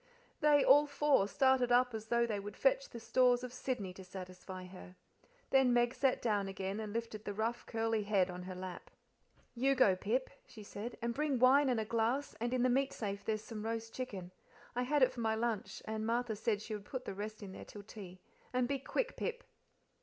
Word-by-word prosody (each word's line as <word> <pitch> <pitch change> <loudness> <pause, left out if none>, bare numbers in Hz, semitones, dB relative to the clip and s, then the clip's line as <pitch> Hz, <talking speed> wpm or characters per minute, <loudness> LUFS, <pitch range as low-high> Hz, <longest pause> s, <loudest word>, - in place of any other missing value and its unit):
They 295 -2 +5
all 290 +2 +7
four, 285 -7 +3
started 260 +2 +3
up 250 0 +4
as 220 0 -5
though 235 0 +3
they 215 -3 -2
would 205 +1 -8
fetch - - +2
the 235 - -8
stores 250 +1 +3
of 250 -1 -6
Sydney 245 -7 -3
to 190 - -10
satisfy 185 0 -8
her. 180 0 -12 0.6
Then 265 -2 +5
Meg 240 0 +3
sat 260 0 +1
down 205 -4 +1
again 195 +1 -3
and 215 -1 -4
lifted 225 -1 -4
the 205 - -4
rough, 225 +3 -2
curly 225 -1 0
head 200 -3 +2
on 180 -1 -6
her 185 0 -7
lap. 185 -1 -7 0.6
"You 270 +3 +2
go, 205 -8 +5
Pip," 230 +8 -1 0.2
she 215 - -11
said, 210 +4 -7
"and 235 0 0
bring 290 0 0
wine 265 +3 +6
and 245 -3 +2
a 220 - -1
glass, 235 +6 0
and 240 +1 0
in 250 -1 +1
the - - +5
meat 270 +2 +2
safe 200 -2 -4
there's 215 -1 -1
some 215 -2 -6
roast 225 0 -3
chicken; 195 -9 -5 0.4
I 245 - +1
had 280 +2 +3
it 255 - +5
for - - -9
my 220 -1 +1
lunch, 220 -4 -2
and 220 0 -3
Martha 230 0 0
said 215 -1 -1
she 215 - -5
would 205 -1 -6
put 255 +2 -5
the - - -4
rest 215 +2 -6
there 190 -2 -8
till 205 - -10
tea; 190 -4 -10 0.3
and 250 -1 +1
be 275 +1 -1
quick, 445 - -2
Pip." 485 +1 -3
225 Hz, 215 wpm, -35 LUFS, 205-255 Hz, 0.6 s, all